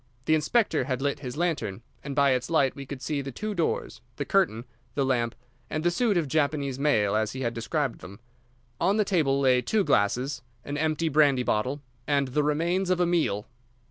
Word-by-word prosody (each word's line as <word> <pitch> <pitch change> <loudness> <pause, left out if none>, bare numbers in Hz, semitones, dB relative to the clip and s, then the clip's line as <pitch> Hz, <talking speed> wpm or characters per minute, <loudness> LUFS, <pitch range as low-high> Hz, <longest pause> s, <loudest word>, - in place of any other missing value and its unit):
The 155 - +3
inspector 155 - +2
had 130 -2 -2
lit 140 +1 -1
his 130 -1 -6
lantern, 155 - -1 0.2
and 140 -1 -5
by 140 -1 +4
its 125 +1 0
light 140 -5 +2
we 140 -1 -8
could 135 -2 -7
see 145 -2 -1
the 135 0 -6
two 215 - -4
doors, 160 - -2
the - - -3
curtain, 110 +3 +1 0.3
the 140 - +1
lamp, 120 -3 0 0.3
and 155 - -2
the 175 - +3
suit 210 +1 +1
of 165 -4 0
Japanese 140 -2 0
mail 110 -9 +2
as 110 0 0
he 130 - -5
had 120 -2 -1
described 125 +3 -2
them. 100 +4 -11 0.6
On 200 +2 +2
the 215 - +3
table 150 -8 +2
lay 130 -2 +4
two 205 - +1
glasses, 125 - +1 0.2
and 145 - -4
empty 155 +2 0
brandy 140 -4 +4
bottle, 130 +6 -1 0.2
and 140 -2 +1
the 150 +4 +1
remains 170 +6 0
of 185 -1 +2
a 180 - +4
meal. 165 -12 0
140 Hz, 205 wpm, -27 LUFS, 125-160 Hz, 0.6 s, by